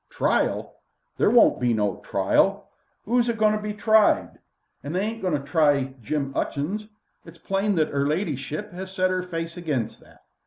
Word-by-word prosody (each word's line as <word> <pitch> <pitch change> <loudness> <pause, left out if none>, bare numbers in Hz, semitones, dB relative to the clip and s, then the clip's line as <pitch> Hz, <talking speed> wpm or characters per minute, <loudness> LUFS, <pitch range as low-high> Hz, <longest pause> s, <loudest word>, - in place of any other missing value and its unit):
"Trial? - - 0 0.4
There - - +3
won't 235 +1 +5
be 120 -2 +2
no 105 -2 0
trial. - - +1 0.4
'Oo's 240 +1 +2
a - - +2
goin' 215 -1 +3
to - - -2
be 210 0 -4
tried? 215 +1 +3 0.4
They 155 +6 -3
ain't 220 +2 -3
agoin' 170 -6 +1
to 140 - -12
try 145 -5 +2
Jim 140 +4 -2
'Utchings. 195 +10 -2 0.4
It's 165 0 -14
plain 195 +4 -1
that 155 -3 0
'er 140 0 +1
ladyship 150 -3 -3
'as 190 +1 -7
set 185 -1 +1
'er 185 0 0
face 165 -1 -5
against 145 -10 -3
that. - - -21
175 Hz, 170 wpm, -24 LUFS, 145-210 Hz, 0.4 s, won't